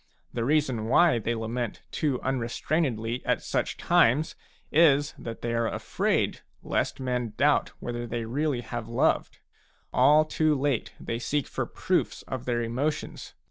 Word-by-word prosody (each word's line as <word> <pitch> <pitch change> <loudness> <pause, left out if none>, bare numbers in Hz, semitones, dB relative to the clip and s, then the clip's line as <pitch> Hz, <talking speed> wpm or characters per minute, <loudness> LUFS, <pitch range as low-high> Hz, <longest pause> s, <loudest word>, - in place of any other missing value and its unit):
The 115 - -1
reason 135 -5 +1
why 130 +2 +4
they 120 +2 -1
lament 115 +1 -3
too 140 -5 0
unrestrainedly 125 -1 -1
at - - 0
such - - -1
times 135 +8 +3 0.4
is 145 -2 +4
that 115 -1 -7
they 120 0 -1
are 115 0 +1
afraid - - 0 0.2
lest - - -1
men 125 -4 -2
doubt 145 +2 +3
whether 120 0 -4
they 115 0 -3
really 135 +2 -1
have 120 -2 -5
loved; 115 0 +1 0.6
all 150 +5 +6
too 155 0 +2
late 135 -3 0
they 115 - -3
seek 140 +4 -1
for - - -3
proofs - - -1
of 130 -2 -5
their 120 -1 0
emotions. 130 +7 -3
125 Hz, 145 wpm, -27 LUFS, 115-145 Hz, 0.6 s, all